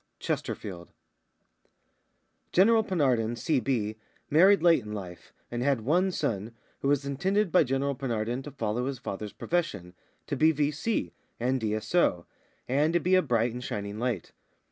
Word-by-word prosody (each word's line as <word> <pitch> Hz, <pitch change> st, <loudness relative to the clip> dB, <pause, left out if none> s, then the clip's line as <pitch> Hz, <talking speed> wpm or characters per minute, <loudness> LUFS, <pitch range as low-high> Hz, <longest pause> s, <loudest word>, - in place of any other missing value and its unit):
CHESTERFIELD. 90 Hz, -4 st, -4 dB, 1.6 s
General 220 Hz, +4 st, +5 dB
Penarden, 125 Hz, -, +1 dB
C.B., 120 Hz, -6 st, 0 dB, 0.3 s
married 185 Hz, +4 st, +6 dB
late 170 Hz, -5 st, +5 dB
in 105 Hz, 0 st, -7 dB
life, 90 Hz, -4 st, -8 dB, 0.2 s
and 120 Hz, 0 st, -2 dB
had 135 Hz, -2 st, +1 dB
one 175 Hz, -, +2 dB
son, 115 Hz, -, -2 dB, 0.2 s
who -, -, -2 dB
was 140 Hz, 0 st, +2 dB
intended 190 Hz, +8 st, 0 dB
by 180 Hz, -, +5 dB
General 135 Hz, +1 st, 0 dB
Penarden 120 Hz, -2 st, -2 dB
to 145 Hz, -, -7 dB
follow 120 Hz, -2 st, -2 dB
his 135 Hz, -1 st, -3 dB
father's 105 Hz, -3 st, -5 dB
profession, 165 Hz, -, -2 dB, 0.3 s
to -, -, -3 dB
be 160 Hz, +1 st, +4 dB
V.C., 150 Hz, +8 st, -1 dB, 0.3 s
and 130 Hz, +2 st, 0 dB
D.S.O., 110 Hz, -, +1 dB, 0.4 s
and 145 Hz, +5 st, +2 dB
to 175 Hz, -, +4 dB
be 180 Hz, +3 st, 0 dB
a 185 Hz, -, +6 dB
bright 115 Hz, -5 st, +1 dB
and 125 Hz, +1 st, -6 dB
shining 100 Hz, -2 st, -4 dB
light. 120 Hz, -7 st, -2 dB
130 Hz, 145 wpm, -28 LUFS, 110-160 Hz, 1.6 s, married